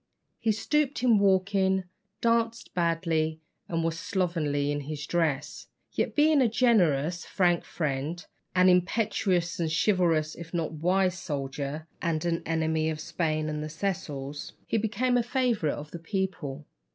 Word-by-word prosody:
He 225 -2 +2
stooped 280 +4 0
in 235 -4 +5
walking, 190 -1 +3 0.4
danced 230 0 +1
badly, 165 -2 0 0.3
and 165 -1 0
was 165 0 -1
slovenly 165 -8 0
in 145 - -1
his 145 +1 -5
dress; 155 -5 -1 0.2
yet - - -1
being 300 -1 +5
a 250 - +5
generous, 175 - +2
frank 175 -3 +2
friend, 150 +2 -3 0.3
an 185 0 +5
impetuous 180 -1 +2
and 165 -2 0
chivalrous 165 -4 +2
if 170 +1 -8
not 165 -2 -1
wise 180 +3 +1
soldier, 140 +1 -4 0.2
and 165 -1 -1
an 170 -1 0
enemy 160 -1 +1
of 155 -1 -3
Spain 155 -1 -1
and 150 0 -3
the 155 - -5
Cecils, 150 -5 -4
he 225 - 0
became 230 +4 +1
a - - +4
favourite 235 - 0
of 150 +1 -8
the 170 - -6
people. 165 -6 -3
170 Hz, 145 wpm, -28 LUFS, 155-200 Hz, 0.4 s, in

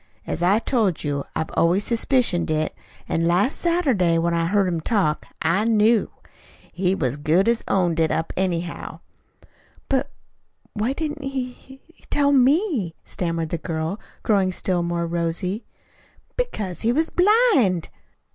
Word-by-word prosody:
As - - -4
I 185 +4 +4
told 220 - 0
you, 145 -2 -2
I've 160 - -2
always 180 +5 +2
suspicioned 230 -8 +2
it, 155 0 0 0.3
an' 165 0 0
last 185 - +2
Saturday, 265 - +2
when 170 +1 +1
I 165 0 +1
heard 200 +1 +2
him 170 -3 -1
talk, 165 -6 0 0.2
I 170 +6 +2
knew. 225 0 +3 0.6
He 185 +1 0
as 130 +1 -1
good 160 +7 +2
as 235 0 +1
owned 175 -4 +1
it 160 -1 +3
up, 160 - -2
anyhow." 175 -2 -3 0.9
"But 275 +1 +1 0.6
why 220 +5 -1
didn't 300 -1 -4
he 265 -2 -3
he 265 +2 -17 0.3
tell 285 -1 +2
me?" 270 - +2
stammered 165 -2 -3
the 170 - -3
girl, 160 +4 -3 0.2
growing 195 -4 +2
still 180 -1 -1
more 170 0 -1
rosy. 170 +5 -2 0.7
"Because 215 - -3
he 230 - +2
was 320 +6 0
blind." 360 - +3
190 Hz, 145 wpm, -23 LUFS, 170-250 Hz, 0.9 s, I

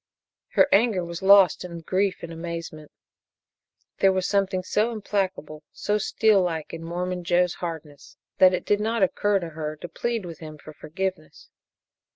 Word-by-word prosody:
Her - - +5
anger 200 -4 +3
was 170 0 -7
lost 195 -3 +6
in 170 -2 -7
grief 190 +3 -1
and 170 0 -6
amazement. 165 -2 -7 1.1
There 195 - +5
was 185 -1 -1
something 195 -2 0
so 215 +5 0
implacable, 195 -8 -3
so 210 0 -1
steel 215 -1 +3
like 165 -4 -3
in 165 0 -6
Mormon 180 +2 -3
Joe's 175 0 +2
hardness 155 -4 -8 0.2
that 185 -1 +7
it - - -5
did 205 - +2
not 220 0 0
occur 205 +2 +2
to 170 -3 -4
her 155 -1 -5
to 155 - -8
plead 230 +1 -3
with 165 -3 -9
him 155 -1 -9
for 155 +1 -12
forgiveness. 175 +1 -6
180 Hz, 165 wpm, -25 LUFS, 165-200 Hz, 1.1 s, that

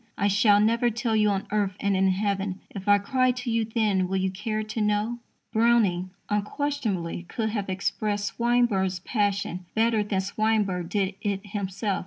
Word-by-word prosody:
I 200 - +2
shall 205 +1 +5
never 230 +3 +3
tell 225 0 -1
you 210 -1 +4
on 195 -1 -1
earth, 205 -3 0
and 200 -1 +1
in 190 0 +3
heaven, 195 0 -1
If 195 0 -8
I 205 0 +7
cry 255 +6 +1
to 250 -1 -4
you 225 -1 +1
then, 210 -5 +1
will 190 +1 -1
you 190 0 0
care 215 +3 -3
to 215 +1 -4
know? 210 +3 0 0.3
Browning, 220 -6 +3 0.2
unquestionably, 210 -6 -2
could 220 -2 -1
have 205 -3 -3
expressed 205 +2 -1
Swinburne's 235 -6 +1
passion 200 -4 -1
better 225 0 +3
than 200 -2 -1
Swinburne 200 -3 0
did 195 +1 0
it 200 0 -2
himself. 200 0 -2
205 Hz, 170 wpm, -26 LUFS, 195-220 Hz, 0.3 s, I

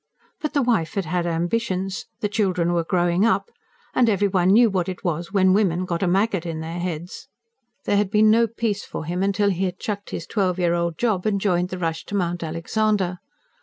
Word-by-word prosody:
But 305 -1 -3
the 285 - +3
wife 220 -10 0
had 195 -3 -1
had 175 +1 -1
ambitions, 185 +3 -2
the 210 - +1
children 185 -5 0
were 170 -1 +1
growing 175 +1 +1
up, 230 - +1 0.4
and 240 -2 +3
every 205 -1 +2
one 185 -2 +2
knew 230 +4 +6
what 190 -4 -1
it 185 - -7
was 170 0 -2
when 190 -2 +4
women 185 -3 +2
got 170 -2 -2
a 190 - +1
maggot 195 0 +1
in 165 -2 -4
their 165 +2 -5
heads. 175 0 -5 0.6
There 205 - +2
had 205 -1 +1
been 215 +1 +5
no 230 +1 +4
peace 220 -2 -2
for - - -6
him 180 +4 0
till 200 +1 +2
he 190 +1 -1
had 180 0 -3
chucked 205 -1 -5
his 170 - -5
twelve 190 -4 0
year 175 -2 +2
old 170 -2 -1
job 215 -5 0
and 200 -2 +1
joined 180 -2 +1
the 185 - -5
rush 165 -2 -2
to 205 - -5
Mount 175 -2 -1
Alexander. 180 +3 -1
185 Hz, 215 wpm, -23 LUFS, 175-205 Hz, 0.6 s, knew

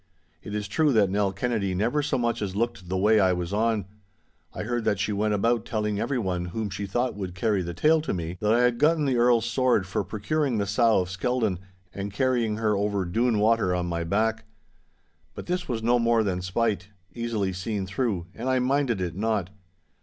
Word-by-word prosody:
It 105 - -6
is 105 -1 -3
true 150 +8 +2
that 100 -4 +3
Nell 100 -1 +1
Kennedy 100 -2 -1
never 120 +10 +1
so 145 - 0
much 120 -2 -1
as 100 -2 -3
looked 115 -5 -2
the 95 - -1
way 105 +3 +4
I 95 -2 +4
was 90 +1 -3
on. 110 -1 +1 0.7
I - - -5
heard 120 +1 -2
that 105 -2 +1
she 105 +1 -1
went 105 +1 +1
about 115 +2 +1
telling 105 -3 -2
everyone 95 -10 -1
whom 105 +3 -4
she 100 +1 -4
thought 120 +5 0
would 95 -3 -6
carry 105 +1 +1
the 85 -1 -5
tale 155 - +3
to 155 - -3
me, 85 -1 -3
that 105 0 +2
I 120 +2 +4
had 125 -1 +2
gotten 155 0 +3
the 130 -3 +1
Earl's 120 -1 +4
sword 120 -3 +2
for 95 - -2
procuring 130 +4 -1
the 100 - 0
sow 110 0 +3
of 90 0 -5
Skeldon, 110 -2 -1 0.3
and 100 +1 -5
carrying 115 -1 0
her 110 -1 +1
over 100 -1 0
Doon 115 +6 +1
water 105 -3 +2
on 90 -1 -1
my 85 -1 -2
back. 110 +5 0 0.9
But - - -7
this 180 0 -2
was 115 -3 -3
no 120 +1 +3
more 115 -1 +3
than 90 -3 -1
spite, 95 0 -1 0.3
easily 110 -5 -2
seen 95 +1 -3
through, 95 -2 -2
and 125 +3 -4
I 130 - +2
minded 125 -4 +1
it 85 -2 -3
not. 105 -3 -1
110 Hz, 210 wpm, -26 LUFS, 95-120 Hz, 0.9 s, way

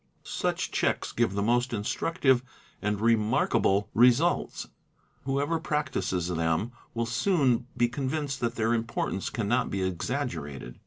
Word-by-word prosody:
~ - - -38
Such - - -2
checks"&!" - - 0
give 115 -4 +1
the 100 - 0
most 120 +2 +1
instructive 130 - +1 0.4
and 105 0 -1
remarkable 105 -3 +2
results; 125 +9 +3 0.6
who 135 0 0
ever 160 +3 0
practises 130 - -1
them 85 +5 0 0.2
will 115 0 0
soon 125 - +2
be 120 0 +4
convinced 135 +2 -2
that 120 0 -1
their 115 +1 +1
importance 115 -4 -2
cannot 120 +3 0
be 95 -1 -2
exaggerated. 85 - -3
120 Hz, 135 wpm, -28 LUFS, 100-130 Hz, 0.6 s, be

